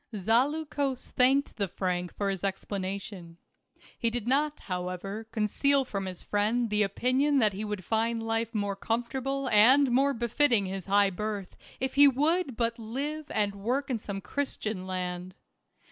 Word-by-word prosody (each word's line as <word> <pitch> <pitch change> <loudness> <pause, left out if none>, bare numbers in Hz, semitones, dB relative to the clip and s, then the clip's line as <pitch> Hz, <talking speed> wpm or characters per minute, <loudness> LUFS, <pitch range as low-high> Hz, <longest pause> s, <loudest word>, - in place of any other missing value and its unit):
Zaleukos 270 - 0
thanked 270 +3 +2
the 200 -2 0
Frank 180 -1 -2
for 200 -1 -1
his 190 -2 -5
explanation. 190 -2 -4 0.6
He 230 - +1
did 235 -1 -4
not, 295 +3 +1
however, 185 +3 -4
conceal 265 +6 +2
from 195 -5 -4
his 185 -1 -7
friend 220 +3 0
the 210 0 +2
opinion 255 +8 +2
that 215 -6 +3
he 200 +3 -4
would 210 -3 -4
find 225 +1 0
life 225 0 -2
more 205 -1 -1
comfortable 260 +6 -2
and 250 +6 +6
more 275 +3 +3
befitting 235 -1 +2
his 190 0 -5
high 200 0 +4
birth 205 0 -4 0.2
if 265 0 -2
he 285 +1 +8
would 285 0 +1
but 230 -1 0
live 285 +7 -4
and 205 -2 0
work 250 +8 -2
in 235 - -1
some 200 -2 -5
Christian 215 -3 -3
land. 180 0 -4
225 Hz, 155 wpm, -28 LUFS, 195-265 Hz, 0.6 s, he